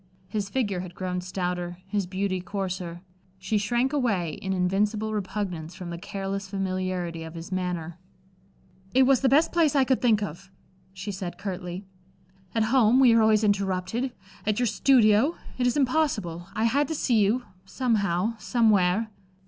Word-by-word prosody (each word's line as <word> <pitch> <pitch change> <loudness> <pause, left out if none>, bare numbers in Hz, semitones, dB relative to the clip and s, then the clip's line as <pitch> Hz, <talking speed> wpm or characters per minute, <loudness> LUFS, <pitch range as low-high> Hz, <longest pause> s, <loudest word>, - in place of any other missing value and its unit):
His 205 -1 -3
figure 205 -6 -1
had 180 -1 -7
grown 180 -1 -3
stouter, 180 -1 -3
his 200 -2 -1
beauty 185 0 -2
coarser. 185 -3 -4 0.4
She 210 +3 -1
shrank 240 +6 0
away 205 - 0
in 190 - -3
invincible 205 +4 0
repugnance 190 -5 -4
from 175 -2 -7
the 170 - -5
careless 195 +1 -4
familiarity 185 -3 -2
of 160 +1 -8
his 165 +3 -8
manner. 180 -2 -3 1.0
"It 265 - +7
was 265 -1 +4
the 270 - +3
best 300 +5 +4
place 325 -4 +3
I 275 - +5
could 260 0 +1
think 220 -4 +3
of," 190 +1 -7 0.4
she 190 +2 -6
said, 185 -3 -5
curtly. 180 0 -5 0.7
"At 225 - +3
home, 250 -1 +5
we 250 -3 +7
are 230 - +5
always 220 0 +4
interrupted; 200 +4 0 0.3
at 215 +1 0
your 245 - +2
studio 240 +4 +4 0.2
it 245 - +3
is 245 - +1
impossible. 245 - 0
I 220 - 0
had 275 +5 +2
to 320 - -3
see 240 -6 +2
you 215 +5 +2 0.2
somehow, 215 -2 0
somewhere." 215 -3 +2
200 Hz, 160 wpm, -26 LUFS, 180-230 Hz, 1.0 s, It